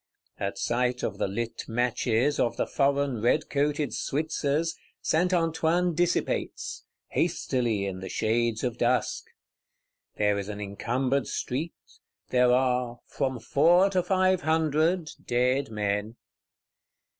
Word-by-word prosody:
At - - -3
sight 125 +1 0
of 100 -1 -3
the - - +1
lit 115 +4 -4
matches, 120 +3 +1
of 115 -1 +1
the - - +1
foreign 140 -4 +1
red 120 +7 +1
coated 145 0 0
Switzers, 155 +2 -1 0.2
Saint 180 +3 +1
Antoine 165 0 +1
dissipates; 175 +2 -1 0.2
hastily, 115 -6 0
in 95 -1 -4
the 95 0 -7
shades 115 +1 0
of 120 -1 -2
dusk. 125 +1 +1 0.9
There 105 -1 +1
is 100 +1 -5
an 105 -1 -5
encumbered 125 +6 -1
street; 150 +7 -3 0.5
there 125 -1 +4
are 125 -1 +1
"from 130 -2 -2
four 170 - +4
to 185 -2 +2
five 185 0 +2
hundred" 160 +2 +1
dead 125 +2 +1
men. 105 +1 -2
130 Hz, 120 wpm, -27 LUFS, 115-155 Hz, 0.9 s, there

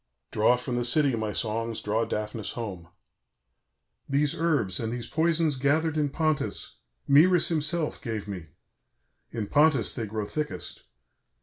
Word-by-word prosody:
"Draw 110 +3 +3
from 125 0 -3
the 120 - 0
city, 135 +1 +3
my 110 -2 -2
songs, 115 +1 -1
draw 110 +2 -1
Daphnis 105 0 -4
home. 95 -8 -6 1.2
"These 140 +1 +2
herbs, 150 - +1
and 115 -1 -3
these 120 -1 -4
poisons 160 -1 +2
gathered 150 +4 +1
in 150 -2 +1
Pontus, 155 0 -2 0.3
Mœris 165 +5 +5
himself 155 0 0
gave 110 -3 -4
me; 90 -5 -7 0.8
in 110 -3 -4
Pontus 145 -2 +3
they 115 -4 -4
grow 105 0 -3
thickest. 150 +6 -5
125 Hz, 135 wpm, -27 LUFS, 110-155 Hz, 1.2 s, Mœris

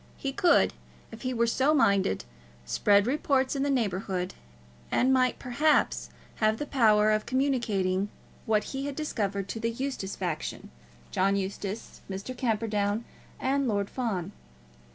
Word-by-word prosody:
He 275 - -3
could, 340 +5 +4 0.4
if 225 - -10
he 255 - -2
were 235 -1 +2
so 265 +6 +2
minded, 200 - +2 0.4
spread 200 - +3
reports 270 0 +1
in 275 - -1
the 285 - +1
neighbourhood, 190 -7 -1 0.6
and 260 +2 +3
might, 255 -1 +3
perhaps, 290 +5 +1 0.3
have 215 0 +2
the 295 - -3
power 215 -6 +4
of 215 0 0
communicating 215 -8 +1 0.4
what 215 -1 +3
he 270 +1 -3
had 285 - -4
discovered 200 -10 -2
to 225 - -4
the 230 +1 0
Eustace 235 -5 -4
faction, 175 -5 -4 0.4
John 195 +1 +2
Eustace, 200 +2 -4
Mr. 195 +7 -5
Camperdown, 220 -2 0 0.3
and 275 0 +1
Lord 200 -3 -1
Fawn. 200 -8 -2
225 Hz, 140 wpm, -28 LUFS, 200-265 Hz, 0.6 s, could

